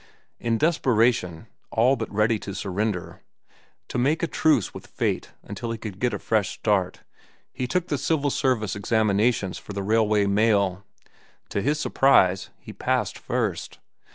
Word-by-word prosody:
In 115 -1 0
desperation, 115 - +1 0.2
all 120 +4 +3
but 115 -3 -5
ready 110 +1 +2
to 100 -1 -7
surrender, 100 -2 -3 0.7
to 125 - -3
make 150 +7 +1
a - - +2
truce 150 - +2
with - - -10
fate - - -2
until 115 +3 -6
he 115 - -3
could 105 -4 -8
get 125 +1 +1
a 105 - -2
fresh 105 -2 0
start, 100 -4 0 0.5
he 125 - -3
took 180 +4 -1
the 145 - -1
civil 145 -3 0
service 125 -8 0
examinations 105 -1 +1
for 105 - -9
the 100 0 -3
Railway 105 0 +2
Mail. 100 -2 +2 0.7
To 100 - -1
his 150 +5 0
surprise, 95 -12 +3
he - - -11
passed - - -1
first. - - -2
110 Hz, 155 wpm, -25 LUFS, 100-125 Hz, 0.7 s, all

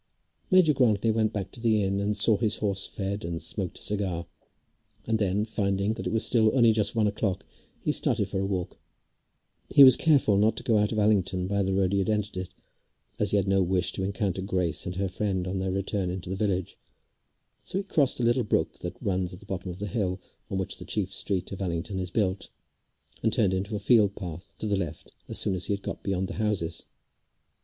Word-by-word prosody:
Major 185 -6 +5
Grantly 115 -4 +2
went 110 -1 +1
back 100 -2 -4
to - - -10
the 110 -3 +2
inn 100 +1 0
and 105 +1 -1
saw 110 +1 +4
his 110 0 +1
horse 100 -2 -1
fed, 100 +1 -4
and 85 0 -3
smoked 90 +3 -4
a - - -5
cigar, 95 -5 -1 0.8
and 110 -1 0
then, 100 +1 +1
finding 100 -1 0
that - - -5
it - - -2
was 110 - +3
still 110 -2 +4
only 115 -3 +6
just 105 -1 +1
one 110 -2 +3
o'clock, 105 -2 -1 0.4
he - - +1
started - - +1
for 95 - -3
a 95 - 0
walk. 95 -3 -3 0.9
He 140 - +8
was 130 -1 +10
careful 140 -10 +3
not 105 +2 +3
to - - -3
go 110 -3 +3
out 105 0 +1
of 110 - -2
Allington 95 -3 +2
by 100 +1 0
the 95 0 0
road 95 -1 +2
he 100 - +2
had 95 - 0
entered 105 -1 -1
it, 95 -1 -4 0.7
as - - +2
he 105 - +2
had 100 -1 0
no 95 0 +3
wish 90 -1 +1
to 95 - -3
encounter 95 -1 -1
Grace 90 -3 -1
and 90 - -4
her 95 +1 -1
friend 95 -1 -2
on 95 +1 -2
their 95 0 -1
return 95 0 -1
into 90 0 -5
the - - -1
village; 95 -3 -2 0.8
so - - -3
he 200 - -1
crossed 145 -10 +1
a - - 0
little 120 +2 +3
brook 105 - -1
which 90 +1 -5
runs 95 -3 -1
at - - -14
the 105 - -16
bottom 95 -2 -5
of 90 - -6
the 100 - -4
hill 100 -4 -2 0.3
on 95 - -2
which 95 - -3
the - - -7
chief 100 -3 -2
street 95 -2 -2
of 100 - -6
Allington 90 +2 -3
is 90 -1 -3
built, 95 -1 -1 0.7
and 110 - +2
turned 105 -7 +2
into 100 +3 -2
a - - -2
field 100 -1 +4
path 90 0 -7
to - - -5
the 105 -2 +1
left 85 -4 -5 0.2
as - - -1
soon 100 - +1
as 90 -1 -3
he - - +1
had 100 - -4
got - - -5
beyond 95 -1 -1
the - - -6
houses. 105 -6 -1
100 Hz, 230 wpm, -27 LUFS, 95-105 Hz, 0.9 s, was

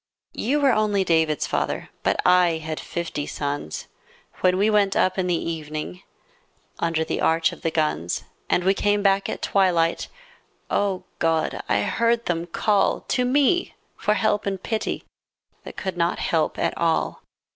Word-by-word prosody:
You 280 +6 0
were, 280 -2 +4
only 210 -3 +2
David's 160 -4 +2
father, - - -2
But - - 0
I 180 -2 +5
had 155 0 -5
fifty 165 -4 -4
sons 145 - -4 0.5
When 185 0 +3
we 200 +2 +3
went 205 -2 +3
up 185 +1 +2
in 185 - 0
the 175 - +2 0.2
evening 155 - -6 0.8
Under 165 -1 0
the - - -2
arch 165 0 +3
of - - -11
the 165 - 0
guns, 150 - -1 0.3
And 175 - +2
we 190 +2 +4
came 205 +1 +1
back 195 0 +2
at - - -5
twilight 175 -4 +2 0.3
— - - -40
O 195 -2 0 0.2
God! 165 -1 0
I 100 - +3
heard 235 - +1
them 170 -1 -1
call 205 +4 +1
To 250 - +2
me 285 +7 +2 0.2
for 210 - +1
help 215 -2 +1
and 195 -1 -3
pity 220 -2 -2 0.6
That - - -9
could 190 -2 -4
not 170 0 +1
help 160 -2 0
at - - 0
all. 165 -1 0
180 Hz, 165 wpm, -24 LUFS, 160-205 Hz, 0.8 s, I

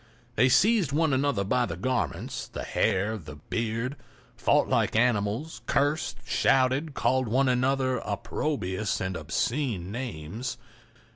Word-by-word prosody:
They 125 - +4
seized 200 - +4
one 155 0 +2
another 130 -6 +1
by 120 +5 +1
the 85 -2 -5
garments, 125 +6 -2
the - - -6
hair, 105 +4 0
the 75 -4 -10
beard—fought 115 - -2
like - - +1
animals, 115 +5 +1
cursed, 145 0 +1
shouted, 135 +5 +2
called 130 -1 +1
one 130 +5 +2
another 130 +1 +1
opprobrious 105 -9 -2
and 95 0 -2
obscene 100 - -2
names. 115 0 -5
125 Hz, 120 wpm, -27 LUFS, 100-135 Hz, -, They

